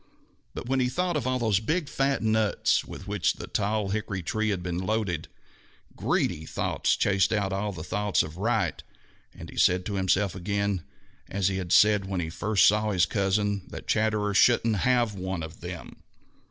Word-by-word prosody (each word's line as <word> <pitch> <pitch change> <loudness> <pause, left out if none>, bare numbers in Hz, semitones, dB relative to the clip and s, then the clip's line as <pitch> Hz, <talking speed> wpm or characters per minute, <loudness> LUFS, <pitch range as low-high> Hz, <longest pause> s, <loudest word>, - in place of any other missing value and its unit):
But - - -6
when 135 +1 +1
he 125 -1 +2
thought 180 +4 -1
of 135 -5 -1
all 130 0 +1
those 110 -5 +2
big, 155 +8 -1
fat 135 -3 0
nuts 110 -1 +2
with 95 - -10
which 105 -3 +1
the - - -8
tall 105 -1 -1
hickory 100 -2 -3
tree 110 +5 -1
had 95 -4 -2
been 90 -1 -3
loaded, 95 -4 -2 0.7
greedy 80 - 0
thoughts - - 0
chased 95 -1 +2
out 100 -3 0
all 105 +2 -1
thoughts 100 +4 0
of 80 +1 -8
right 115 +5 0 0.5
and - - -11
he - - -13
said 90 0 +3
to 105 - -3
himself 95 0 +1
again, 100 0 -1 0.5
as 95 0 0
he 95 - -2
had 90 -2 -4
said 105 -2 +5
when 95 -1 -3
he 80 -2 -3
first 105 +5 +2
saw 105 +1 +2
his 95 -3 +3
cousin, 100 +1 0
that - - -9
Chatterer 105 -1 +1
shouldn't 115 +1 +4
have 120 +1 +2
one 95 -3 -4
of 80 +1 -9
them. 85 -1 -8
100 Hz, 180 wpm, -27 LUFS, 95-110 Hz, 0.7 s, said